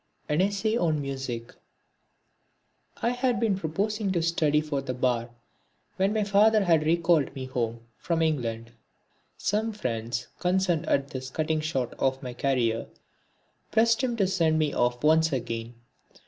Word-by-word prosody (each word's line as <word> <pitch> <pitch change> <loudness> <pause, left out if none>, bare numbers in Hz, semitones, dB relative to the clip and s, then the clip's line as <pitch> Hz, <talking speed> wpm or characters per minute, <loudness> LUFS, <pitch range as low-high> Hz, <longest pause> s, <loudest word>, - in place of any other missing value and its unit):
(31) 150 +3 +2
An 190 - +4
Essay 215 +3 0
on 160 -7 +1
Music 135 -4 -5 1.5
I 235 - +3
had 245 -1 0
been 225 -4 +2
proposing 195 +4 -1
to 170 -2 0
study 155 -3 +2
for 150 -2 -2
the 130 -2 -4
bar 120 -2 0 0.7
when 195 +2 +2
my 215 0 +1
father 205 +1 +4
had 165 -4 +3
recalled 165 -4 +2
me 130 -1 -5
home 115 -3 -3 0.2
from 165 -1 0
England. 115 -7 -2 0.7
Some 220 +2 0
friends 115 - -3
concerned 180 -3 +1
at 140 0 +1
this 130 0 -5
cutting 155 +2 -1
short 135 -6 -2
of 135 +1 0
my 125 -1 -5
career 120 -3 0 0.8
pressed 230 +2 +3
him 245 -2 0
to 200 - +3
send 170 -4 +2
me 155 -2 +1
off 120 +1 0
once 160 +1 +4
again. 115 -2 -4
155 Hz, 150 wpm, -27 LUFS, 130-190 Hz, 1.5 s, An